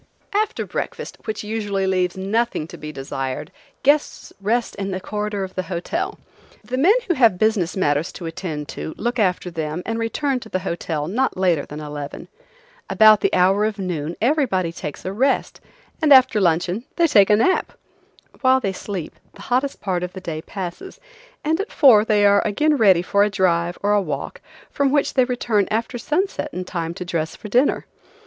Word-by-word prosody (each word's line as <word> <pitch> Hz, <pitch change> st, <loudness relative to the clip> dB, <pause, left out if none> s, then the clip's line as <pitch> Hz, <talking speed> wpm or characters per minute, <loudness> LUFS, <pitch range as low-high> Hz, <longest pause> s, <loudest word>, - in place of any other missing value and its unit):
After 425 Hz, +1 st, 0 dB
breakfast, -, -, -5 dB
which 215 Hz, -1 st, -4 dB
usually 205 Hz, -3 st, -2 dB
leaves 185 Hz, -1 st, 0 dB
nothing 200 Hz, -3 st, -1 dB
to -, -, -9 dB
be 150 Hz, 0 st, -7 dB
desired, 135 Hz, 0 st, -5 dB, 0.3 s
guests 290 Hz, +2 st, +1 dB
rest 230 Hz, +4 st, 0 dB
in 195 Hz, 0 st, -3 dB
the 185 Hz, -1 st, -3 dB
corridor 210 Hz, +1 st, -3 dB
of 190 Hz, 0 st, -6 dB
the 185 Hz, -, -2 dB
hotel; 195 Hz, -, -3 dB, 0.5 s
the 255 Hz, +1 st, -3 dB
men 370 Hz, -, +5 dB
who 350 Hz, -, +2 dB
have 230 Hz, -, +4 dB
business 200 Hz, -4 st, +1 dB
matters 145 Hz, -2 st, +1 dB
to 175 Hz, -, -8 dB
attend 160 Hz, -3 st, -5 dB
to 160 Hz, -, -6 dB
look 240 Hz, +2 st, -2 dB
after 180 Hz, -3 st, 0 dB
them 160 Hz, +1 st, -4 dB
and 225 Hz, 0 st, -2 dB
return 260 Hz, +4 st, -1 dB
to 225 Hz, -, -12 dB
the 185 Hz, -, -1 dB
hotel 165 Hz, -4 st, -3 dB
not 250 Hz, +7 st, 0 dB
later 175 Hz, -6 st, +1 dB
than 150 Hz, -, -8 dB
eleven. 145 Hz, -1 st, -7 dB, 0.6 s
About 215 Hz, -1 st, +6 dB
the -, -, +1 dB
hour 190 Hz, +3 st, +3 dB
of 215 Hz, 0 st, -1 dB
noon 170 Hz, -4 st, -3 dB
everybody 235 Hz, -, +1 dB
takes 150 Hz, -3 st, -7 dB
a 190 Hz, -, -3 dB
rest, 265 Hz, +6 st, 0 dB, 0.4 s
and 310 Hz, -2 st, +3 dB
after 260 Hz, -5 st, +6 dB
luncheon 175 Hz, +4 st, +1 dB
they 340 Hz, -, +3 dB
take 205 Hz, -11 st, +5 dB
a 210 Hz, -, +6 dB
nap. 305 Hz, -, +2 dB, 0.7 s
While 260 Hz, -1 st, +4 dB
they 195 Hz, -6 st, -2 dB
sleep 185 Hz, -3 st, -6 dB, 0.2 s
the -, -, -12 dB
hottest 260 Hz, +3 st, -1 dB
part 185 Hz, -4 st, -1 dB
of 180 Hz, 0 st, -5 dB
the 190 Hz, -, -7 dB
day 160 Hz, -4 st, -5 dB
passes, 195 Hz, -, -7 dB, 0.4 s
and 320 Hz, +3 st, 0 dB
at 405 Hz, -, -7 dB
four 245 Hz, -8 st, +6 dB
they 210 Hz, -2 st, +3 dB
are 200 Hz, 0 st, +5 dB
again 295 Hz, +9 st, +2 dB
ready 195 Hz, -9 st, +4 dB
for 200 Hz, +2 st, +2 dB
a 210 Hz, -, +2 dB
drive 175 Hz, -3 st, +1 dB
or 205 Hz, -, +2 dB
a 205 Hz, -, +3 dB
walk, 150 Hz, -7 st, -5 dB, 0.3 s
from 280 Hz, -1 st, +1 dB
which 290 Hz, -1 st, +1 dB
they 255 Hz, -2 st, +4 dB
return 235 Hz, -5 st, 0 dB
after 230 Hz, +3 st, -2 dB
sunset 320 Hz, +3 st, -1 dB
in 180 Hz, -6 st, -5 dB
time 170 Hz, -2 st, -4 dB
to 180 Hz, -, -6 dB
dress 160 Hz, -2 st, -2 dB
for 210 Hz, -, -9 dB
dinner. 250 Hz, +7 st, +2 dB
200 Hz, 190 wpm, -21 LUFS, 175-240 Hz, 0.7 s, About